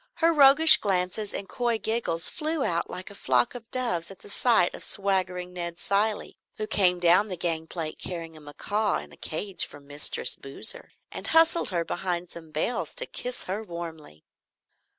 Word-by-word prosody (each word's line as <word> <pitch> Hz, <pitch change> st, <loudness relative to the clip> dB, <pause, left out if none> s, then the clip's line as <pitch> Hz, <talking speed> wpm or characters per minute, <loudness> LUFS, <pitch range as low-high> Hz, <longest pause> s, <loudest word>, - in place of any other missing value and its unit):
Her 330 Hz, 0 st, +3 dB
roguish 295 Hz, +2 st, +8 dB
glances 195 Hz, +1 st, -1 dB
and 200 Hz, -, -6 dB
coy 240 Hz, -2 st, -1 dB
giggles 220 Hz, -6 st, 0 dB
flew 310 Hz, -2 st, 0 dB
out 170 Hz, 0 st, -1 dB
like 185 Hz, +2 st, -7 dB
a -, -, -11 dB
flock 125 Hz, -10 st, +1 dB
of 235 Hz, -2 st, -10 dB
doves 180 Hz, -10 st, -1 dB
at 195 Hz, -, -10 dB
the 205 Hz, -, -11 dB
sight 225 Hz, -8 st, +3 dB
of -, -, -9 dB
swaggering 185 Hz, -2 st, -1 dB
Ned 170 Hz, -1 st, -5 dB
Cilley, 205 Hz, +4 st, -1 dB, 0.2 s
who 215 Hz, -, -3 dB
came 185 Hz, -4 st, +2 dB
down 175 Hz, +4 st, +4 dB
the 185 Hz, -3 st, -6 dB
gangplank 160 Hz, -1 st, -4 dB
carrying 165 Hz, -3 st, -6 dB
a 155 Hz, -, -13 dB
macaw 205 Hz, +8 st, -1 dB
in -, -, -9 dB
a -, -, -14 dB
cage 185 Hz, +4 st, -1 dB
for 145 Hz, -, -13 dB
"Mistress 145 Hz, +1 st, -1 dB
Boozer," 135 Hz, +10 st, -2 dB, 0.2 s
and -, -, -7 dB
hustled 325 Hz, +1 st, +4 dB
her 170 Hz, -3 st, -1 dB
behind 175 Hz, -1 st, -3 dB
some 165 Hz, -2 st, -11 dB
bales 155 Hz, +11 st, -3 dB
to -, -, -1 dB
kiss 250 Hz, -, -5 dB
her 200 Hz, +4 st, -4 dB
warmly. 165 Hz, -, -9 dB
185 Hz, 175 wpm, -26 LUFS, 170-220 Hz, 0.2 s, roguish